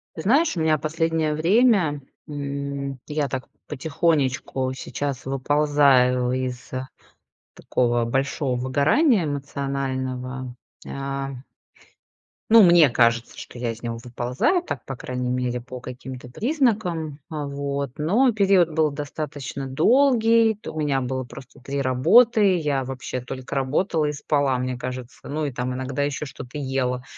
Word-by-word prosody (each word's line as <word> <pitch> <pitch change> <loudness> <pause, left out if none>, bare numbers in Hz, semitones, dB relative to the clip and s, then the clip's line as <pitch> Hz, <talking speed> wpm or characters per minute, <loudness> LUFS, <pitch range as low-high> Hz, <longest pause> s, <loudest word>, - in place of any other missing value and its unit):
Ты 160 - -5
знаешь, 280 - +3
у 165 - -1
меня 160 -1 +3
последнее 160 +1 0
время, 175 - +3 0.2
м, 140 -2 -4
я 150 -1 -1
так 130 0 -5 0.2
потихонечку 135 -3 0
сейчас 135 0 -4
выползаю 135 -2 +3
из 125 -1 -4 0.8
такого 120 -1 0
большого 135 +2 -1
выгорания 160 - +3
эмоционального, 135 -3 -3 0.3
а. 135 0 -4 1.2
Ну, 225 0 +9
мне 170 -5 +7
кажется, 115 -1 +2
что - - -10
я 120 -1 -2
из 115 0 -10
него 115 -1 -4
выползаю, 125 - 0
так, - - -6
по 135 - -5
крайней 125 0 -4
мере, 125 -1 -1
по 125 +1 -9
каким-то 125 0 -9
признакам. 200 - -1
Вот, 140 -3 -4
но 220 - +3
период 195 -4 +4
был 155 -1 +1
достаточно 145 -1 -5
долгий, 230 - +4
то 210 - -9
у 155 - -5
меня 140 -3 +1
было 130 +1 -2
просто 130 +1 -13
3 140 +2 -3
работы. 200 - +5
Я 145 -5 0
вообще 130 -1 -5
только 130 +2 -7
работала 150 +5 0
и 150 - -1
спала, 140 -3 0
мне 125 0 -2
кажется. 125 0 -7
Ну, 155 +2 -2
и 145 - -2
там 125 0 -3
иногда 130 +2 -2
ещё 145 +1 -3
что-то 130 +2 -8
ела, 130 -2 -1
140 Hz, 135 wpm, -23 LUFS, 130-160 Hz, 1.2 s, Ну